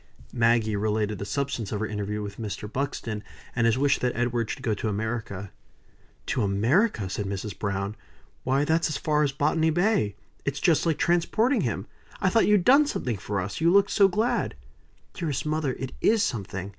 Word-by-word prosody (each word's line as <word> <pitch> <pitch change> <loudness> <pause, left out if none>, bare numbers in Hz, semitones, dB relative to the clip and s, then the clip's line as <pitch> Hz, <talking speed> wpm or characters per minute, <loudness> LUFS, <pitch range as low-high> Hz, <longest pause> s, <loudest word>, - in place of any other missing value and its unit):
Maggie 115 -2 +2
related 105 0 -1
the 100 - -4
substance 120 -1 -2
of 105 - -2
her 110 - -1
interview 105 0 -3
with 100 +1 -7
Mr. 105 -2 -5
Buxton, 115 -3 -3 0.3
and 120 -1 +3
his 115 - +2
wish 140 +1 +2
that 125 -1 -1
Edward 120 -2 0
should 130 - -5
go 115 -4 +1
to 105 - -3
America. 105 -2 -4 0.7
"To 125 - -1
America!" 110 - +2
said 100 +1 -3
Mrs. 100 0 -4
Browne. 100 0 -2 0.5
"Why 135 +3 +2
that's 160 +1 +2
as 155 - -2
far 150 -1 +1
as 145 -2 +2
Botany 155 +4 +1
Bay. 175 - +1 0.3
It's 140 0 -2
just 165 +2 +3
like 160 - +1
transporting 215 +9 +2
him. - - -2 0.3
I - - +2
thought 225 - +3
you'd 205 -4 +4
done 285 +3 +6
something 125 - -2
for 100 +1 -3
us, 100 - -4
you 170 +1 +4
looked 200 +1 +4
so 200 -2 +6
glad." 225 +6 0 0.6
"Dearest 155 -6 -3
mother, 155 -3 0
it 130 0 -5
is 220 -1 +4
something. 95 -4 -3
120 Hz, 185 wpm, -26 LUFS, 105-160 Hz, 0.7 s, done